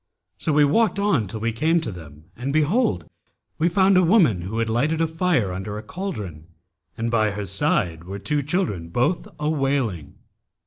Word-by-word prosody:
So 155 Hz, -, -1 dB
we 150 Hz, 0 st, +5 dB
walked 215 Hz, +9 st, +2 dB
on 200 Hz, -, +1 dB
till 110 Hz, +2 st, -6 dB
we 115 Hz, +1 st, 0 dB
came 160 Hz, +9 st, +2 dB
to 155 Hz, -, -4 dB
them; 75 Hz, -4 st, -12 dB
and 130 Hz, +3 st, -3 dB
behold! 150 Hz, -, +1 dB, 0.5 s
we 165 Hz, +2 st, +3 dB
found 190 Hz, +1 st, +4 dB
a 185 Hz, -, +5 dB
woman 165 Hz, -, +4 dB
who 100 Hz, +6 st, -5 dB
had 115 Hz, 0 st, 0 dB
lighted 140 Hz, +8 st, 0 dB
a 165 Hz, -, +3 dB
fire 160 Hz, -, 0 dB
under 105 Hz, +3 st, -5 dB
a 105 Hz, -, -7 dB
cauldron 105 Hz, -, -6 dB, 0.5 s
and 115 Hz, 0 st, -2 dB
by 110 Hz, -2 st, +2 dB
her 100 Hz, 0 st, -4 dB
side 85 Hz, -3 st, 0 dB
were 95 Hz, +2 st, -6 dB
two 145 Hz, +8 st, -1 dB
children, 140 Hz, -, -2 dB
both 125 Hz, -, 0 dB
a 150 Hz, -, -1 dB
wailing. 135 Hz, -, -1 dB
125 Hz, 185 wpm, -23 LUFS, 100-160 Hz, 0.5 s, we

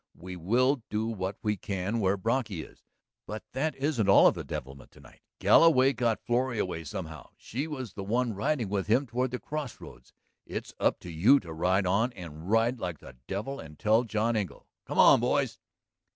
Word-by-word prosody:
"We 90 Hz, +1 st, -8 dB
will 120 Hz, -, +2 dB
do 105 Hz, +1 st, -1 dB
what 100 Hz, -3 st, -3 dB
we 105 Hz, -1 st, 0 dB
can 100 Hz, +3 st, -3 dB
where 100 Hz, -1 st, +2 dB
Brocky 110 Hz, -5 st, -1 dB
is. -, -, -16 dB, 0.5 s
But 105 Hz, 0 st, -6 dB
that 140 Hz, +3 st, -1 dB
isn't 135 Hz, -7 st, 0 dB
all 95 Hz, -, +7 dB
of -, -, +6 dB
the -, -, -6 dB
devilment 65 Hz, +1 st, -7 dB
to -, -, -17 dB
night. -, -, -18 dB, 0.2 s
Galloway 135 Hz, -5 st, +5 dB
got 115 Hz, -4 st, 0 dB
Florrie 120 Hz, 0 st, 0 dB
away 90 Hz, -5 st, -3 dB
somehow; 80 Hz, -1 st, -7 dB
she 135 Hz, +7 st, -4 dB
was 130 Hz, -9 st, -6 dB
the 100 Hz, -, -6 dB
one 120 Hz, +3 st, 0 dB
riding 120 Hz, +3 st, -1 dB
with 100 Hz, 0 st, -2 dB
him 120 Hz, +6 st, +3 dB
toward 125 Hz, +2 st, -1 dB
the 125 Hz, -, -3 dB
crossroads. 140 Hz, -, -7 dB, 0.3 s
It's -, -, -6 dB
up -, -, +1 dB
to 90 Hz, -, -8 dB
you 105 Hz, -, +5 dB
to 85 Hz, -4 st, -9 dB
ride 95 Hz, +4 st, +1 dB
on 110 Hz, +7 st, +1 dB
and 85 Hz, -1 st, -9 dB
ride 115 Hz, +3 st, +2 dB
like 90 Hz, -5 st, -4 dB
the 65 Hz, -, -13 dB
devil 110 Hz, +8 st, -4 dB
and 75 Hz, -1 st, -11 dB
tell 110 Hz, +3 st, +3 dB
John 115 Hz, 0 st, 0 dB
Engle.... 100 Hz, -5 st, -4 dB, 0.2 s
Come -, -, -5 dB
on, -, -, +7 dB
boys!" -, -, 0 dB
110 Hz, 195 wpm, -29 LUFS, 95-125 Hz, 0.5 s, all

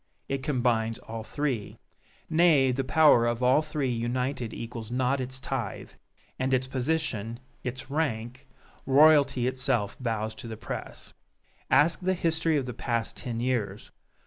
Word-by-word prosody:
It 135 Hz, -1 st, -2 dB
combines 120 Hz, -5 st, 0 dB
all 115 Hz, 0 st, -7 dB
three. 125 Hz, -3 st, -3 dB, 0.5 s
Nay, 155 Hz, -5 st, +4 dB
the 135 Hz, +2 st, -1 dB
power 135 Hz, -4 st, +5 dB
of 120 Hz, +1 st, -1 dB
all 130 Hz, +4 st, +5 dB
three 150 Hz, -4 st, -2 dB
united 125 Hz, +1 st, -2 dB
equals 115 Hz, -1 st, -7 dB
not 130 Hz, +2 st, 0 dB
its 130 Hz, +1 st, -5 dB
tithe; 130 Hz, -6 st, -4 dB, 0.5 s
and 130 Hz, 0 st, +2 dB
its 130 Hz, 0 st, 0 dB
position 130 Hz, -5 st, -2 dB, 0.2 s
its 130 Hz, +2 st, -5 dB
rank! 130 Hz, -3 st, -2 dB, 0.4 s
royalty 140 Hz, -2 st, +5 dB
itself 130 Hz, -5 st, -1 dB
bows 110 Hz, -3 st, -2 dB
to -, -, -8 dB
the 110 Hz, -1 st, -6 dB
press! -, -, -7 dB, 0.6 s
Ask 160 Hz, +1 st, +4 dB
the 185 Hz, 0 st, 0 dB
history 165 Hz, -2 st, +1 dB
of 135 Hz, -, -1 dB
the 125 Hz, -, -5 dB
past 115 Hz, -1 st, -2 dB
ten 115 Hz, -2 st, -4 dB
years. 115 Hz, -5 st, -2 dB
130 Hz, 145 wpm, -28 LUFS, 115-140 Hz, 0.6 s, power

